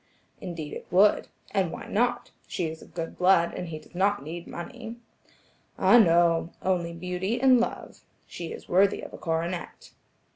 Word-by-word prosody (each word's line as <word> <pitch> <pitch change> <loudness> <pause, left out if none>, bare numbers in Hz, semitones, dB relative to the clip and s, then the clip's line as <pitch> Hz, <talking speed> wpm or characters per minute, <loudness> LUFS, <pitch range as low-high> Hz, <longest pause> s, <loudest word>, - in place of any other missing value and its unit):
"Indeed 165 -5 -6
it - - -8
would. 195 +4 +4 0.2
And 190 -5 +1
why - - -7
not? 240 +4 0 0.2
She 180 - -2
is 160 0 -5
of - - -16
good 165 -1 -5
blood, 180 -2 +4
and 180 - -5
he 160 -2 -5
does 155 - -16
not 200 +1 +1
need 170 +3 -7
money." 175 +6 -7 0.8
"Ah, 240 - +6
no! 170 -3 +4
only 175 -3 0
beauty 180 +6 -3
and 260 -1 +6
love. 235 - -3 0.3
She 170 - -7
is - - -9
worthy 195 +2 +3
of - - -9
a - - -9
coronet." 170 +1 -3
180 Hz, 170 wpm, -27 LUFS, 170-195 Hz, 0.8 s, Ah